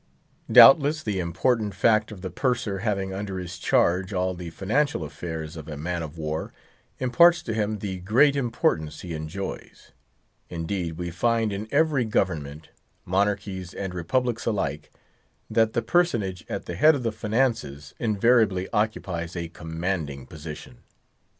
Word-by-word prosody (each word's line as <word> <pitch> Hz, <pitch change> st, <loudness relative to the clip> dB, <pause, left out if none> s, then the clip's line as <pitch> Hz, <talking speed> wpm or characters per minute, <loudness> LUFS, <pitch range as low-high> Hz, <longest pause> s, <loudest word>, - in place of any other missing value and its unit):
Doubtless 150 Hz, +2 st, +8 dB
the 105 Hz, -3 st, -2 dB
important 100 Hz, +5 st, 0 dB
fact 110 Hz, +2 st, +3 dB
of 100 Hz, -4 st, -9 dB
the 95 Hz, -, -5 dB
Purser 120 Hz, -7 st, -1 dB
having 100 Hz, -2 st, -1 dB
under 95 Hz, -1 st, -4 dB
his 90 Hz, -2 st, -6 dB
charge 95 Hz, +3 st, +2 dB
all 90 Hz, 0 st, 0 dB
the 90 Hz, -1 st, -7 dB
financial 110 Hz, -, 0 dB
affairs 80 Hz, 0 st, -6 dB
of 80 Hz, -2 st, -9 dB
a 75 Hz, -2 st, -6 dB
man 85 Hz, +3 st, -3 dB
of 80 Hz, 0 st, -7 dB
war, 80 Hz, 0 st, -3 dB, 0.5 s
imparts 170 Hz, +7 st, +4 dB
to 115 Hz, -, -3 dB
him 110 Hz, 0 st, -1 dB
the 95 Hz, -2 st, -5 dB
great 125 Hz, +10 st, +4 dB
importance 80 Hz, -, -1 dB
he 85 Hz, -2 st, -6 dB
enjoys. 80 Hz, +5 st, -7 dB, 0.6 s
Indeed, 85 Hz, -1 st, -3 dB
we 85 Hz, -1 st, -4 dB
find 115 Hz, +4 st, +1 dB
in 100 Hz, +2 st, -4 dB
every 155 Hz, -3 st, +2 dB
government—monarchies 95 Hz, +3 st, -2 dB
and 95 Hz, -2 st, -4 dB
republics 120 Hz, +8 st, -1 dB
alike—that 105 Hz, +4 st, -3 dB
the 115 Hz, -, +1 dB
personage 115 Hz, -, 0 dB
at -, -, -4 dB
the -, -, -5 dB
head 155 Hz, +1 st, +5 dB
of 130 Hz, -, -4 dB
the 115 Hz, -, 0 dB
finances 110 Hz, -, -1 dB
invariably 110 Hz, -4 st, +2 dB
occupies 95 Hz, -6 st, -2 dB
a 85 Hz, -1 st, -4 dB
commanding 80 Hz, -5 st, -4 dB
position. 75 Hz, -5 st, -10 dB
95 Hz, 140 wpm, -25 LUFS, 85-115 Hz, 0.6 s, Doubtless